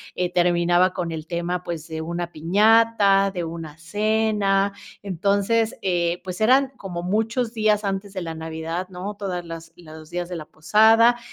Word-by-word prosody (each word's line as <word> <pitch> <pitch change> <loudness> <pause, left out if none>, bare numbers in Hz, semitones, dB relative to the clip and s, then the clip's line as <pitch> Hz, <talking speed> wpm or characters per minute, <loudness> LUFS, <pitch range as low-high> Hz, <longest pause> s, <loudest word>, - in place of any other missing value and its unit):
eh, 180 0 -1
terminaba 175 +1 +3
con 170 -2 -3
el 160 0 -6
tema, 175 +1 -2
pues, 170 -2 -6
de 160 -1 -5
una 170 +1 -4
piñata, 200 +3 +4
de 175 -2 -4
una 165 -2 -7
cena, 205 +1 +1 0.3
entonces, 200 +4 +1
eh, 175 -1 0
pues 185 0 -6
eran 260 +5 +4
como 175 -3 -6
muchos 225 +5 -1
días 215 -1 +2
antes 195 0 -3
de 185 - -4
la 165 -1 -5
navidad, 160 +3 -5
¿no?, 190 +3 -6
todas 185 -3 -4
las 165 0 -9
los 155 -2 -13
días 175 0 -4
de 180 - -5
la 155 - -7
posada. 225 +9 +4
180 Hz, 165 wpm, -23 LUFS, 170-210 Hz, 0.3 s, piñata